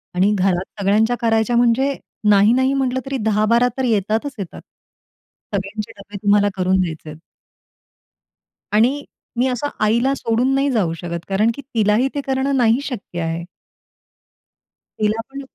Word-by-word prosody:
आणि 190 +3 +3
घरात 185 -1 +1 0.2
सगळ्यांच्या 215 +4 +2
करायच्या 225 0 +2
म्हणजे, 245 +4 +3 0.4
नाही 205 +2 +5
नाही 260 +2 +2
म्हटलं, 260 -1 0
तरी 270 0 -3
10-12 220 +3 +3
तर 265 - -1
येतातच 220 +4 0
येतात. 190 -4 -7 0.9
सगळ्यांचे 200 +2 -4
डब्बे 200 +1 -9
तुम्हाला 205 0 +4
करून 185 0 +1
द्यायचे 160 -3 -4
आहेत. 155 0 -10 1.5
आणि 250 +7 +2 0.4
मी 255 - +3
असं 260 +3 -2
आईला 235 +5 +2
सोडून 245 +1 0
नाही 275 +1 +2
जाऊ 195 -9 +1
शकत. 170 +1 -5
कारण 210 +4 +2
की 280 - -7
तिलाही 225 -1 +1
ते 285 - -1
करणं 270 +1 0
नाही 235 0 +3
शक्य 220 -10 -6
आहे. 165 +1 -3 1.6
तिला 215 +1 +1
पण 275 +1 -7
220 Hz, 145 wpm, -20 LUFS, 200-255 Hz, 1.6 s, नाही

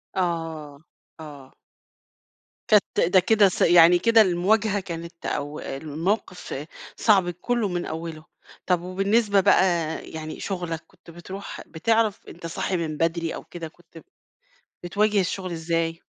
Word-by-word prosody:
آه، 165 -5 -3 0.4
آه. 145 -4 -11 1.2
كانت 210 -2 +3
ده 185 - +8
كده 205 +1 +4
ص - - -5
يعني 175 0 +7
كده 225 +3 +5
المواجهة 205 +3 +2
كانت 170 -2 -8
أو 145 +1 -3
الموقف 155 +1 -4 0.3
صعب 195 -5 +3
كله 215 +5 -1
من 175 -1 -3
أوّله، 160 -1 -6 0.4
طب 180 -2 +1
وبالنسبة 200 +3 +2
بقى 195 0 +5 0.5
يعني 155 0 -7
شُغلك 175 -4 -4
كنت 170 - -17
بتروح 185 +4 -8
بتعرف 220 +5 0
أنت 170 0 -11
صاحي 175 +2 -2
من 155 -2 -3
بدري 165 0 -1
أو - - -8
كده 170 -2 -8
كنت 165 +1 -19
ب 165 - -12 0.8
بتواجه 205 +3 +2
الشُّغل 185 0 -3
إزاي؟ 165 0 -2
175 Hz, 130 wpm, -24 LUFS, 165-195 Hz, 1.2 s, ده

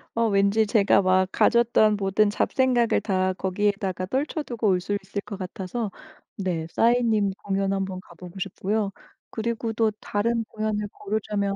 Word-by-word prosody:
어 230 0 +2
왠지 200 +1 +3
제가 205 -2 +4
막 185 0 +3
가졌던 235 -3 +4
모든 200 +1 +2
잡생각을 240 +2 +2
다 185 -2 0
거기에다가 190 0 -1
떨쳐 285 - -2
두고 235 -5 -2
올 185 -1 +3
수 205 +3 -2
있을 195 +1 -5
것 200 - -7
같아서 195 +3 -4 0.5
네 175 -5 -2
싸이님 230 -4 +3
공연 195 0 0
한번 190 -1 -3
가보고 180 +1 -12
싶고요. 200 +2 -2 0.4
그리고 230 0 -2
또 225 -1 +2
다른 230 +3 0
공연을 215 -1 -2
고르자면 205 -1 -2
205 Hz, 310 characters per minute, -25 LUFS, 195-225 Hz, 0.5 s, 제가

